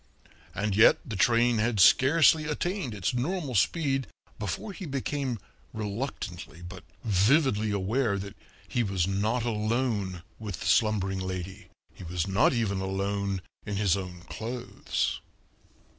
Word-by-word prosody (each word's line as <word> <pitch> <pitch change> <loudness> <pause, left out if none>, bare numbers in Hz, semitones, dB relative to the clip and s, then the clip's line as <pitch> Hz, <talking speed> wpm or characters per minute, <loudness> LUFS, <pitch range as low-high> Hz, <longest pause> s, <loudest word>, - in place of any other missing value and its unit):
And 100 0 -1
yet 110 +3 +7
the 110 - -5
train 120 +3 +3
had 110 -1 +1
scarcely 150 - +6
attained 155 - -2
its 95 0 -1
normal 145 +3 -2
speed 135 - +1 0.3
before 110 - -4
he 190 -3 -7
became 135 -2 -2 0.4
reluctantly 100 - -5
but 90 +1 -9 0.2
vividly 110 - +3
aware 100 +2 0
that 100 0 -7 0.3
he 120 - 0
was 95 -6 0
not 105 +5 0
alone 110 -5 -1 0.2
with 105 -5 -6
the - - -5
slumbering 95 -4 +2
lady; 95 +1 -5 0.3
he - - -11
was 85 -1 -2
not 95 +1 +3
even 105 -6 0
alone 100 0 -2 0.2
in 105 - -4
his 100 -3 +2
own 90 -3 -6
clothes. 115 +7 -3
105 Hz, 130 wpm, -28 LUFS, 95-125 Hz, 0.4 s, yet